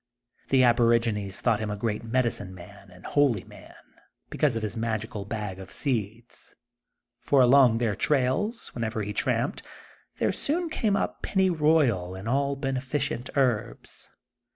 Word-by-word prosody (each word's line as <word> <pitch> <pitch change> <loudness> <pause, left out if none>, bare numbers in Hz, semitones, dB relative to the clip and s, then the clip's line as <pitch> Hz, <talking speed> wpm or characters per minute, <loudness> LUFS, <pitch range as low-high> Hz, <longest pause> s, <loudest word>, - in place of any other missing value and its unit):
The 130 -1 +4
aborigines 115 -4 +2
thought 105 - +2
him 110 -1 -3
a 105 - -2
great 105 +1 -3
medicine 115 -5 -1
man 95 +2 -13
and 90 -1 -16
holy 135 -9 +2
man, - - -15 0.6
because 145 -6 +1
of 115 - -3
his 105 - -3
magical 110 -2 -3
bag 105 -3 -5
of 95 - -10
seeds, 115 -3 -4 0.6
for 140 - +2
along 125 -2 +6
their 115 -3 0
trails, 150 - 0
wherever 110 -2 -3
he 105 +1 -4
tramped, - - -1 0.6
there - - +1
soon 335 +4 -1
came 215 -9 +1
up - - -2
pennyroyal 155 - +2
and 95 +3 -8
all 140 +3 +1
beneficient 135 -1 -2
herbs. 120 -5 -1
115 Hz, 140 wpm, -26 LUFS, 105-140 Hz, 0.6 s, along